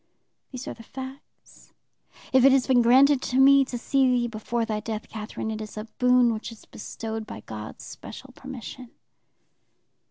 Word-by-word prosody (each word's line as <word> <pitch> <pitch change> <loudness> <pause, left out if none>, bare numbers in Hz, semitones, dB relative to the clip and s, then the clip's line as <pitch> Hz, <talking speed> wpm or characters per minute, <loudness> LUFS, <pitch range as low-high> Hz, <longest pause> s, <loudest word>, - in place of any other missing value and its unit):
These 255 -1 -7
are - - -4
the - - -14
facts. 265 +4 -12 0.6
If 260 -1 +6
it 275 - +8
has 265 -1 +3
been 255 -2 +4
granted 260 +3 +5
to 250 - -2
me 275 +1 +7
to 250 - -5
see 265 +2 +2
thee 245 -1 +2
before 230 +1 -2
thy 215 -2 -2
death, 220 0 -5
Catherine, 220 0 -5
it 220 0 -5
is 215 0 -8
a 215 - -3 0.2
boon 250 -1 +4
which 220 +2 -6
is 225 - -14
bestowed 220 0 -6
by - - -8
God's 110 -1 -8
special 260 +4 -10
permission.' 255 -1 -9
245 Hz, 170 wpm, -25 LUFS, 220-265 Hz, 0.6 s, it